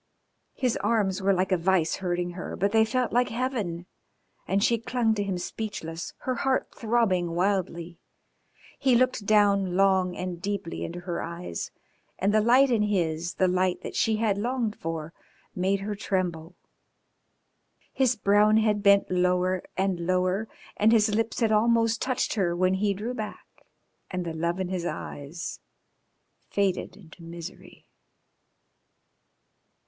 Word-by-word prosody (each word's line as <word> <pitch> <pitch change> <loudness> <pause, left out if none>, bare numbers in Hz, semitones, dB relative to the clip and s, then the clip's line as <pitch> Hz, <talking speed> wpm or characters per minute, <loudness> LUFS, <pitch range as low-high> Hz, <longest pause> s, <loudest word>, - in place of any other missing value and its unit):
His 250 -3 0
arms 200 -4 0
were 195 +1 +3
like 190 0 +1
a 185 - +4
vice 175 -1 +1
hurting 175 -1 -2
her, 180 +1 -6
but 200 +1 0
they 220 0 +5
felt 250 +2 0
like 245 +1 +3
heaven, 225 -8 -2 0.6
and 200 +1 +1
she 235 0 +3
clung 230 -1 +1
to 210 - -2
him 195 -2 -2
speechless, 175 -3 -5
her 255 - -1
heart 265 -1 +1
throbbing 200 -7 +1
wildly. 175 -2 -1 0.8
He 260 -3 +3
looked 245 -4 +1
down 200 -3 +3
long 190 -2 +3
and 180 -2 -5
deeply 200 -3 -3
into 175 +1 -5
her 175 -1 -3
eyes, 170 - -5 0.5
and 200 +2 +1
the 215 - +4
light 255 +4 +5
in 230 -3 +3
his 175 -5 -1
the 185 - +2
light 185 0 +1
that - - -6
she 220 -1 +2
had 215 -2 0
longed 235 -1 -1
for 165 0 -5 0.4
made 190 +2 0
her 210 +1 -3
tremble. 180 -4 -2 1.4
His 255 -2 +2
brown 210 +1 +4
head 215 -2 +2
bent 200 -1 +4
lower 180 0 +1 0.2
and 190 -2 0
lower, 185 +3 +1 0.3
and 215 +2 +4
his 215 -2 +4
lips 225 +3 -1
had 225 -1 +3
almost 230 +1 +3
touched 255 -2 0
her 180 -5 0
when 185 +1 +2
he 200 +1 +1
drew 220 +6 -4
back, 215 -3 -8 0.4
and 180 -1 -3
the 165 - -3
love 170 +3 -1
in 185 -1 -2
his 185 -2 -2
eyes 165 0 -6 0.9
faded 195 -2 -1
into 175 -3 -16
misery. 170 +2 -10
195 Hz, 150 wpm, -27 LUFS, 180-220 Hz, 1.4 s, they